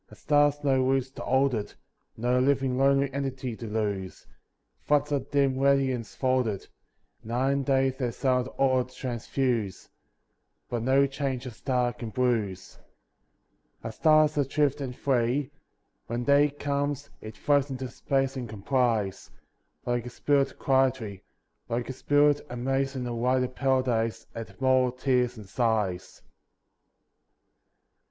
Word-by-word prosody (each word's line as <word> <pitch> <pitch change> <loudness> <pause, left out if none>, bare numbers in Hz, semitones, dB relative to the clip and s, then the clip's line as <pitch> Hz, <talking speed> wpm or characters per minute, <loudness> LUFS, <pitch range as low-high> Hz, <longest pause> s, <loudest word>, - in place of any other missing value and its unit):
A - - -13
star 145 0 +3
has 145 - -8
do 135 -3 +2
roots 130 0 +1
to - - -9
hold 130 +1 +2
it, 105 -3 -4 0.4
No 125 +2 +1
living 135 -1 +2
lonely 135 +1 +2
entity 135 -3 -3
to 115 - -7
lose. 105 -3 -3 0.5
Floods 150 - +1
of 140 -2 -1
dim 135 -2 +2
radiance 135 -4 +1
fold 130 -2 +1
it; 100 -3 -4 0.6
Night 125 +4 0
and 140 0 0
day 135 -1 +2
their 130 -2 -3
silent 125 0 0
aura 130 -2 +3
transfuse, 120 -4 -3 0.8
But 120 -2 -2
no 135 +3 +4
change 135 -2 -3
a 125 - -5
star 125 +1 -1
oan 115 -2 -7
bruise. 115 -6 -1 1.0
A 115 - -4
star 155 +6 +5
is 150 0 -2
adrift 145 0 +1
and 130 -2 -4
free. 130 +1 0 0.6
When 120 +1 -2
day 145 +2 +4
comes, 145 0 -3
it 110 0 -9
floats 145 +1 +2
into 130 -1 -4
space 135 +2 -1
and 125 -3 -5
com 105 -2 -9
plies; 115 -7 0 0.6
Like 120 0 -1
a - - -5
spirit 140 +2 0
quietly, 130 -7 +1 0.5
Like 120 +2 -2
a - - -3
spirit, 145 +2 +3
amazed 135 +2 -1
in 125 -1 -3
a 120 - -3
wider 125 +2 +1
paradise 125 -4 0
At 115 -1 -8
mortal 130 -1 +3
tears 125 -2 +1
and 105 -3 -10
sighs. 105 -5 -1
130 Hz, 145 wpm, -27 LUFS, 120-140 Hz, 1.0 s, star